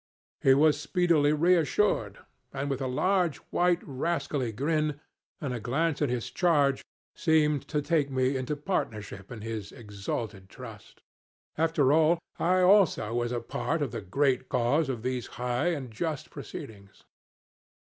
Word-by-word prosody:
He 135 Hz, -1 st, +6 dB
was 150 Hz, 0 st, +4 dB
speedily 165 Hz, -4 st, +2 dB
reassured, 165 Hz, -, +2 dB, 0.3 s
and 140 Hz, +1 st, -3 dB
with 135 Hz, -, -2 dB
a 130 Hz, -, -1 dB
large, 180 Hz, +5 st, +1 dB, 0.2 s
white, 175 Hz, 0 st, +2 dB
rascally 140 Hz, -3 st, -2 dB
grin, 150 Hz, +4 st, -1 dB, 0.4 s
and 140 Hz, -5 st, -3 dB
a 120 Hz, -, -3 dB
glance 150 Hz, +7 st, -1 dB
at 145 Hz, -, +2 dB
his 120 Hz, -2 st, -3 dB
charge, 145 Hz, -6 st, +2 dB, 0.3 s
seemed 150 Hz, -4 st, +2 dB
to 150 Hz, -2 st, -1 dB
take 150 Hz, -3 st, +1 dB
me 130 Hz, 0 st, +1 dB
into 130 Hz, +3 st, -2 dB
partnership 105 Hz, -, -4 dB
in 115 Hz, -3 st, -7 dB
his 110 Hz, -2 st, -5 dB
exalted 105 Hz, -2 st, -6 dB
trust. 115 Hz, -6 st, -12 dB, 0.5 s
After 155 Hz, -4 st, +2 dB
all, 160 Hz, +2 st, +4 dB, 0.2 s
I 185 Hz, +2 st, +3 dB
also 180 Hz, -, +4 dB
was 120 Hz, 0 st, -1 dB
a 120 Hz, -1 st, -2 dB
part 155 Hz, +6 st, -2 dB
of 140 Hz, -, -3 dB
the 115 Hz, -, -5 dB
great 130 Hz, +6 st, 0 dB
cause 135 Hz, +5 st, +1 dB
of 120 Hz, -4 st, -3 dB
these 125 Hz, -2 st, -2 dB
high 125 Hz, +5 st, 0 dB
and 140 Hz, -8 st, -2 dB
just 155 Hz, +5 st, -4 dB
proceedings. 105 Hz, -7 st, -10 dB
140 Hz, 145 wpm, -28 LUFS, 120-160 Hz, 0.5 s, He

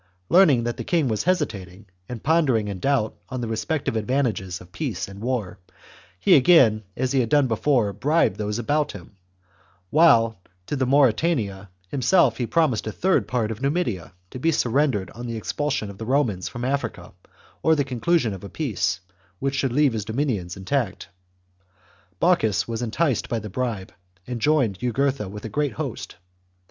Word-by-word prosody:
Learning 155 Hz, -10 st, +5 dB
that 120 Hz, 0 st, -3 dB
the -, -, -4 dB
king 165 Hz, -6 st, +1 dB
was 110 Hz, -3 st, -1 dB
hesitating 110 Hz, -, -2 dB, 0.2 s
and 120 Hz, -3 st, -7 dB
pondering 140 Hz, -9 st, +2 dB
in 100 Hz, -2 st, -5 dB
doubt 130 Hz, -2 st, 0 dB
on 130 Hz, -, -4 dB
the 120 Hz, -, -3 dB
respec 125 Hz, +7 st, -2 dB
tive -, -, -1 dB
advantages 110 Hz, -6 st, -1 dB
of 90 Hz, 0 st, -15 dB
peace -, -, -3 dB
and 100 Hz, +1 st, -11 dB
war, 110 Hz, -6 st, -3 dB, 0.6 s
he 90 Hz, -, +5 dB
again, 130 Hz, -7 st, +5 dB, 0.2 s
as 130 Hz, 0 st, 0 dB
he 135 Hz, -, +2 dB
had 120 Hz, -3 st, 0 dB
done 145 Hz, +1 st, +4 dB
before, 115 Hz, -2 st, +1 dB
bribed 145 Hz, -, +1 dB
those 105 Hz, 0 st, -2 dB
about 145 Hz, +5 st, 0 dB
him, 100 Hz, +1 st, -12 dB, 0.8 s
while 115 Hz, -, +4 dB, 0.2 s
to 145 Hz, -, -3 dB
the 130 Hz, -2 st, 0 dB
Mauritanian 125 Hz, -, +2 dB, 0.2 s
himself 135 Hz, -, +3 dB
he 120 Hz, -, -2 dB
promised 150 Hz, -10 st, +1 dB
a -, -, -2 dB
third 155 Hz, -, +1 dB
part 115 Hz, -3 st, -1 dB
of 110 Hz, +2 st, -6 dB
Numidia, 140 Hz, -, -1 dB, 0.2 s
to 130 Hz, -, -7 dB
be 165 Hz, +5 st, +2 dB
surrendered 125 Hz, -, +1 dB
on 120 Hz, +1 st, -8 dB
the 115 Hz, -1 st, -4 dB
expulsion 110 Hz, -, -2 dB
of 100 Hz, -, -14 dB
the 110 Hz, -, -5 dB
Romans 120 Hz, -9 st, +1 dB
from 120 Hz, +1 st, -5 dB
Africa 125 Hz, -9 st, -3 dB, 0.5 s
or 160 Hz, -, +4 dB
the 145 Hz, -, +1 dB
conclusion 130 Hz, -1 st, 0 dB
of 95 Hz, -, -9 dB
a 100 Hz, -, -7 dB
peace 115 Hz, -9 st, -2 dB, 0.4 s
which 135 Hz, +7 st, -2 dB
should 135 Hz, -2 st, 0 dB
leave 140 Hz, 0 st, +3 dB
his 105 Hz, -2 st, -3 dB
dominions 110 Hz, -8 st, -2 dB
intact. 100 Hz, +1 st, -2 dB, 1.1 s
Bocchus 140 Hz, -, +2 dB
was 115 Hz, 0 st, -3 dB
enticed 120 Hz, +3 st, 0 dB
by 115 Hz, -, -1 dB
the 105 Hz, -2 st, -6 dB
bribe, 115 Hz, -4 st, -3 dB, 0.3 s
and 120 Hz, -2 st, -5 dB
joined 125 Hz, -9 st, +2 dB
Jugurtha 125 Hz, -2 st, -1 dB
with 105 Hz, +2 st, -8 dB
a -, -, -4 dB
great 145 Hz, 0 st, -1 dB
host. -, -, -5 dB
120 Hz, 175 wpm, -24 LUFS, 105-140 Hz, 1.1 s, Learning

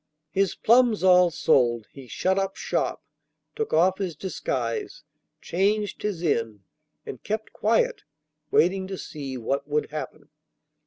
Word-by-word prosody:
His 195 Hz, +1 st, +1 dB
plums 235 Hz, -3 st, +4 dB
all 180 Hz, -1 st, +6 dB
sold, 120 Hz, -8 st, +2 dB
he 135 Hz, -2 st, -12 dB
shut 190 Hz, -, 0 dB
up 195 Hz, 0 st, -2 dB
shop, -, -, -2 dB, 0.5 s
took 445 Hz, -1 st, -3 dB
off 185 Hz, +4 st, +3 dB
his 185 Hz, -5 st, -3 dB
disguise, 130 Hz, -9 st, -3 dB, 0.4 s
changed 205 Hz, +4 st, 0 dB
his 200 Hz, -5 st, -3 dB
inn, 115 Hz, -, -1 dB, 0.4 s
and 130 Hz, -, -8 dB
kept 215 Hz, +1 st, -4 dB
quiet, 225 Hz, +2 st, +1 dB, 0.5 s
waiting 190 Hz, +2 st, +2 dB
to 190 Hz, 0 st, -5 dB
see 140 Hz, -6 st, -6 dB
what 140 Hz, +4 st, -2 dB
would 150 Hz, 0 st, -1 dB
happen. 155 Hz, 0 st, -7 dB
180 Hz, 135 wpm, -25 LUFS, 140-195 Hz, 0.5 s, all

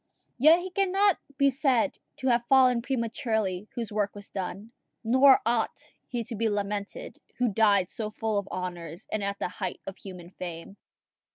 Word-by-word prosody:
Yet 315 Hz, +6 st, +7 dB
he 370 Hz, +1 st, -6 dB
cannot 390 Hz, 0 st, +2 dB, 0.2 s
be 280 Hz, 0 st, +4 dB
said 270 Hz, 0 st, +1 dB, 0.2 s
to 265 Hz, -, -3 dB
have 240 Hz, 0 st, +2 dB
fallen 255 Hz, -3 st, +5 dB
prematurely 225 Hz, -6 st, -2 dB
whose 230 Hz, -3 st, -3 dB
work 205 Hz, -1 st, -1 dB
was 205 Hz, 0 st, -9 dB
done; 195 Hz, +3 st, -5 dB, 0.3 s
nor 260 Hz, +4 st, +6 dB
ought 230 Hz, -1 st, -1 dB
he 240 Hz, -2 st, -3 dB
to 230 Hz, -, -6 dB
be 225 Hz, +1 st, +1 dB
lamented 205 Hz, 0 st, -4 dB, 0.2 s
who 250 Hz, -1 st, +2 dB
died 200 Hz, -4 st, +3 dB
so 215 Hz, -2 st, -4 dB
full 215 Hz, -1 st, -1 dB
of 200 Hz, -, -7 dB
honours, 175 Hz, -1 st, -6 dB
and 215 Hz, -1 st, -1 dB
at 200 Hz, 0 st, -2 dB
the -, -, -2 dB
height 185 Hz, -1 st, -5 dB
of 195 Hz, -, -7 dB
human 180 Hz, -3 st, -10 dB
fame. 175 Hz, +2 st, -8 dB
220 Hz, 170 wpm, -28 LUFS, 200-255 Hz, 0.3 s, Yet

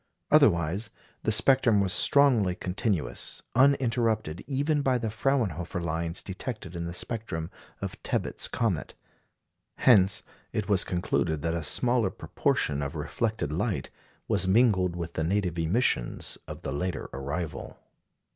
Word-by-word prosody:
Otherwise 100 Hz, -, +4 dB, 0.3 s
the 110 Hz, -, 0 dB
spectrum 115 Hz, -1 st, +4 dB
was 95 Hz, -1 st, +1 dB
strongly 120 Hz, -12 st, +4 dB
continuous, 90 Hz, -, -2 dB
uninterrupted 115 Hz, -, +2 dB
even 145 Hz, +2 st, +1 dB
by 130 Hz, -2 st, +2 dB
the 115 Hz, -3 st, -3 dB
Fraunhofer 105 Hz, -, -1 dB
lines 85 Hz, 0 st, -2 dB
detected 95 Hz, -2 st, -6 dB
in 85 Hz, 0 st, -3 dB
the 85 Hz, -, -4 dB
spectrum 90 Hz, -4 st, -4 dB, 0.3 s
of -, -, -5 dB
Tebbutt's -, -, -1 dB
comet. 110 Hz, -9 st, -2 dB, 0.8 s
Hence 100 Hz, -5 st, +5 dB, 0.3 s
it 105 Hz, -2 st, -2 dB
was 100 Hz, -3 st, +3 dB
concluded 85 Hz, -3 st, -1 dB
that 80 Hz, 0 st, 0 dB
a 85 Hz, -, -1 dB
smaller 120 Hz, -, +1 dB
proportion 70 Hz, -1 st, -1 dB
of 70 Hz, +3 st, -4 dB
reflected 110 Hz, +3 st, -2 dB
light -, -, -2 dB, 0.4 s
was 100 Hz, -4 st, +1 dB
mingled 95 Hz, -4 st, +3 dB
with 85 Hz, -1 st, -5 dB
the 80 Hz, -, -1 dB
native 90 Hz, -1 st, 0 dB
emissions 85 Hz, -, 0 dB
of -, -, -8 dB
the -, -, -3 dB
later 85 Hz, +5 st, -3 dB
arrival. 70 Hz, +5 st, -5 dB
95 Hz, 130 wpm, -28 LUFS, 85-115 Hz, 0.8 s, Hence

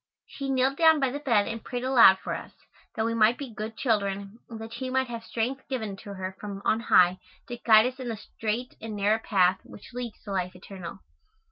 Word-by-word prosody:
She 275 Hz, -1 st, -6 dB
kneeled 265 Hz, +1 st, +1 dB
down 320 Hz, -2 st, +6 dB
by 270 Hz, -2 st, +1 dB
the 285 Hz, -, -4 dB
bed 230 Hz, -8 st, +2 dB
and 230 Hz, -1 st, -5 dB
prayed 245 Hz, 0 st, -4 dB
aloud 245 Hz, -7 st, +7 dB
for -, -, -5 dB
us, -, -, -7 dB, 0.4 s
that 220 Hz, -, 0 dB
we 230 Hz, -, 0 dB
might 230 Hz, +1 st, +4 dB
be 270 Hz, -5 st, -7 dB
good 215 Hz, +1 st, -6 dB
children 200 Hz, -2 st, -1 dB
and 225 Hz, -2 st, -8 dB
that 225 Hz, 0 st, -8 dB
she 260 Hz, -1 st, -4 dB
might 260 Hz, 0 st, 0 dB
have 230 Hz, -1 st, -6 dB
strength 240 Hz, +4 st, -3 dB
given 220 Hz, -7 st, -3 dB
to 200 Hz, 0 st, -9 dB
her 190 Hz, 0 st, -5 dB
from 200 Hz, -2 st, -6 dB
on 220 Hz, -, +2 dB
high 180 Hz, -5 st, +4 dB, 0.3 s
to 240 Hz, -, -5 dB
guide 220 Hz, -2 st, +6 dB
us 255 Hz, +1 st, -3 dB
in 250 Hz, -2 st, -4 dB
the 225 Hz, -, -3 dB
straight 225 Hz, +3 st, -4 dB
and 220 Hz, -1 st, -5 dB
narrow 205 Hz, +2 st, +2 dB
path 190 Hz, -4 st, +2 dB
which 205 Hz, -, -14 dB
leads 245 Hz, -2 st, -5 dB
to 205 Hz, -, -7 dB
life 185 Hz, -1 st, -2 dB
eternal. 185 Hz, 0 st, -9 dB
225 Hz, 225 wpm, -27 LUFS, 200-250 Hz, 0.4 s, aloud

